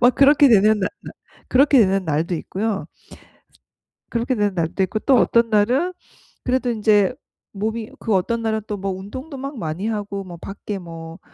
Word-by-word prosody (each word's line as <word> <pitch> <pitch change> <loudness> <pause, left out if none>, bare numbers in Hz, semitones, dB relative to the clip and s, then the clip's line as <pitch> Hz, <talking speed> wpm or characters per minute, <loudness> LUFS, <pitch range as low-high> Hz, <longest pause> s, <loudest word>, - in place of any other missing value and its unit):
막 245 +1 +5
그렇게 285 +1 +6
되는 215 -1 +5
나 190 - +1
날 - - -9 0.4
그렇게 275 +1 +5
되는 195 -3 +3
날도 160 +2 -1
있고요. 200 +5 -3
스 - - -33 1.0
그렇게 240 +2 -1
되는 205 -3 0
날도 170 +3 0
있고 205 +4 -1
또 265 - +3
어떤 235 0 +3
날은 245 - +2 0.5
그래도 255 0 0
인제 215 -1 +3 0.4
몸이 220 +2 -3
그 225 - -1
어떤 230 +5 0
날은 220 -1 -1
또 210 - -3
뭐 195 0 -3
운동도 260 - -7
막 275 +1 -6
많이 170 +2 -3
하고 205 -2 -3
뭐 175 -2 -10
밖에 200 +3 -6
뭐 165 -1 -9
215 Hz, 310 characters per minute, -21 LUFS, 190-240 Hz, 1.0 s, 그렇게